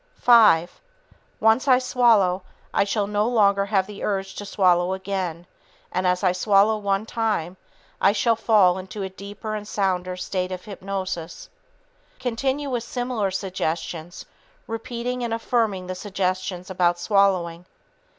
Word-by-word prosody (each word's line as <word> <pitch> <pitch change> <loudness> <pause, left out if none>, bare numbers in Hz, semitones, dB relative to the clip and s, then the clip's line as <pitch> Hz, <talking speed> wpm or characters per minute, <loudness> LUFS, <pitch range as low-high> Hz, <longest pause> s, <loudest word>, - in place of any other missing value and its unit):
Five... 215 -8 +5 0.6
Once 225 +5 +3
I 255 -2 +6
swallow, 230 -8 +3 0.3
I - - +3
shall 205 0 0
no 210 +1 0
longer 200 -4 +3
have 195 -2 +2
the 205 0 -9
urge 195 -1 -2
to 205 - -6
swallow 180 -2 +2
again, 185 -3 -4 0.5
and 185 0 0
as 180 +2 +1
I 185 - +4
swallow 200 +3 +3
one 200 0 -1
time, 215 -7 -2 0.5
I 195 - +5
shall 225 +3 +2
fall 205 -5 +3
into 195 +2 -7
a 190 - -4
deeper 200 +3 -7
and 210 -1 -5
sounder 185 -3 -1
state 185 0 -3
of 185 +2 -6
hypnosis." 190 -4 -5 0.7
Continue 265 +3 -2
with 240 -2 -1
similar 245 -4 -2
suggestions, 175 -3 -4 0.4
repeating 240 +2 -4
and 230 -1 -1
affirming 225 -5 -1
the 185 - -4
suggestions 185 -1 -3
about 175 -2 +2
swallowing. 180 -3 +1
195 Hz, 140 wpm, -23 LUFS, 185-220 Hz, 0.7 s, I